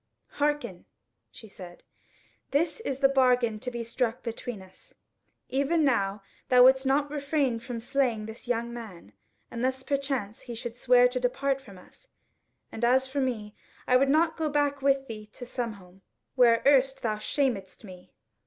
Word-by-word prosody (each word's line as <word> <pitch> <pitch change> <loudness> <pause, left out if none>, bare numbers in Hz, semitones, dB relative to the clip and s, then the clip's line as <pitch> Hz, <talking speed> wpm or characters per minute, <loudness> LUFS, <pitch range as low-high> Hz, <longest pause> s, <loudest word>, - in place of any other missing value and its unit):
"Hearken," 295 0 -1 0.4
she 220 - -13
said, 180 -3 -12 0.7
"this 310 +7 0
is 275 - -4
the 270 - +7
bargain 250 -5 +2
to 250 - -4
be 240 -1 -5
struck 235 0 -2
between 230 -1 -5
us: 190 0 -15 0.5
even 280 +5 +1
now 200 -7 +1 0.3
thou 250 -1 +7
wouldst 265 +1 +5
not 285 +2 +1
refrain 280 -4 0
from 235 0 -6
slaying 240 -3 0
this 220 +2 -10
young 235 0 -1
man, 195 - -10 0.4
unless 260 +2 -2
perchance 270 -7 -2
he 240 - -8
should 230 0 -6
swear 245 0 +5
to 250 +1 -3
depart 270 +2 -1
from 200 -8 -14
us; 185 - -19 0.6
and 225 - -7
as 255 +2 +4
for 270 +1 -3
me, 220 -5 -3 0.3
I 250 - +4
would 270 +2 +4
not 320 +3 +2
go 315 -2 -1
back 290 -1 0
with 275 0 +2
thee 215 -2 -8
to 245 - -9
Sunhome, 205 -7 -6 0.3
where 235 -3 +4
erst 270 -1 +3
thou 215 -2 0
shamedst 215 -5 -2
me. 185 -3 -13
250 Hz, 160 wpm, -27 LUFS, 225-275 Hz, 0.7 s, the